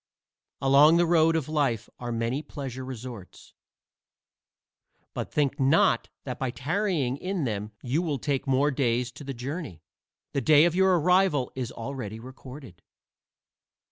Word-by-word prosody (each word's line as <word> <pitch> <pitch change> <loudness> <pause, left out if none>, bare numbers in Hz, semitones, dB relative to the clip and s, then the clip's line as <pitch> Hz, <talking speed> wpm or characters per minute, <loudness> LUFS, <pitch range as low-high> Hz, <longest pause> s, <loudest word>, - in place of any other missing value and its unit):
Along 140 +4 +6
the 175 - +4
road 165 -1 +4
of 160 -5 -1
life 140 -8 0
are 120 -1 -4
many 115 +4 -1
pleasure 135 -4 -7
resorts, 120 -6 -9 1.6
but - - -5
think 145 -1 0
not 160 +10 +3
that 125 -3 -6
by 130 - -1
tarrying 140 - -1
in 185 +1 -3
them 105 -3 -3
you 135 +6 0
will 155 -5 -1
take 140 +1 -2
more 135 +2 +3
days 125 -2 0
to 145 - -11
the 135 -1 -6
journey. 125 - -6 0.5
The 140 - 0
day 155 +2 +6
of 175 - +2
your 190 -1 +4
arrival 180 -5 +2
is 125 -2 -4
already 115 -3 -6
recorded. 130 - -11
135 Hz, 140 wpm, -27 LUFS, 125-155 Hz, 1.6 s, Along